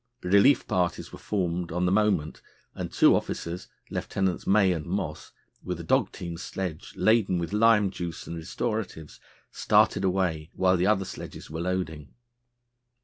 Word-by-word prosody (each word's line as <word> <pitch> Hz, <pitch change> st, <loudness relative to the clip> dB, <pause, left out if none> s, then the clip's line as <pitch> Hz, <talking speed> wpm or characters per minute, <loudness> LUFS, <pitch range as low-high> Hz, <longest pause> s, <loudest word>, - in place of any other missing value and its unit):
Relief 100 Hz, +9 st, +4 dB
parties 90 Hz, -1 st, -1 dB
were -, -, -9 dB
formed 90 Hz, -4 st, -2 dB
on 90 Hz, +2 st, 0 dB
the 90 Hz, -, +2 dB
moment, 95 Hz, -7 st, +1 dB, 0.3 s
and -, -, -5 dB
two -, -, +5 dB
officers, 85 Hz, +2 st, -4 dB, 0.2 s
Lieutenants 95 Hz, -2 st, -2 dB
May 100 Hz, -1 st, +4 dB
and 80 Hz, -2 st, -5 dB
Moss, 85 Hz, -4 st, -4 dB, 0.3 s
with 90 Hz, -2 st, -4 dB
a -, -, -6 dB
dog 80 Hz, -, +2 dB
team 85 Hz, -1 st, -6 dB
sledge 90 Hz, -2 st, -5 dB
laden 110 Hz, -5 st, +3 dB
with 85 Hz, +2 st, -3 dB
lime 105 Hz, -2 st, +4 dB
juice 85 Hz, -3 st, -6 dB
and 85 Hz, -, -6 dB
restoratives, 90 Hz, -, -4 dB, 0.3 s
started -, -, +3 dB
away 90 Hz, -5 st, 0 dB
while 95 Hz, 0 st, +3 dB
the 90 Hz, +1 st, +1 dB
other 100 Hz, -2 st, +2 dB
sledges -, -, -9 dB
were 80 Hz, +1 st, -4 dB
loading. 85 Hz, -5 st, -3 dB
90 Hz, 150 wpm, -27 LUFS, 85-100 Hz, 0.3 s, two